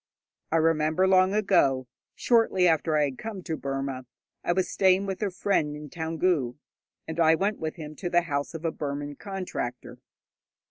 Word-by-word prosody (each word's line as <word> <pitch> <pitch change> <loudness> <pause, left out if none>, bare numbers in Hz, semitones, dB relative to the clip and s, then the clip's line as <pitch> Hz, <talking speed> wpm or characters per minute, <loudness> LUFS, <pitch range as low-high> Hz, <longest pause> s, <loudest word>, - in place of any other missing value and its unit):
I - - +1
remember 160 +2 +3
long 190 +1 +4
ago, 135 -11 +3 0.3
shortly 225 -6 +3
after 160 -1 +2
I 150 - +3
had 135 -3 -3
come 215 -4 -6
to 165 -3 -3
Burma, 135 -3 -4 0.4
I - - +1
was 185 +1 +1
staying 190 0 +3
with 190 0 -4
a 205 - +1
friend 180 -5 0
in 150 -1 -9
Toungoo, 160 -6 0 0.5
and 160 +1 -5
I 160 -1 +5
went 200 +5 -1
with 160 -1 -3
him 155 -2 -8
to 175 - -3
the 175 0 +4
house 145 -1 -3
of 165 +1 -6
a 165 - +1
Burman 145 -1 -5
contractor. 185 -11 -5
165 Hz, 175 wpm, -27 LUFS, 145-185 Hz, 0.5 s, I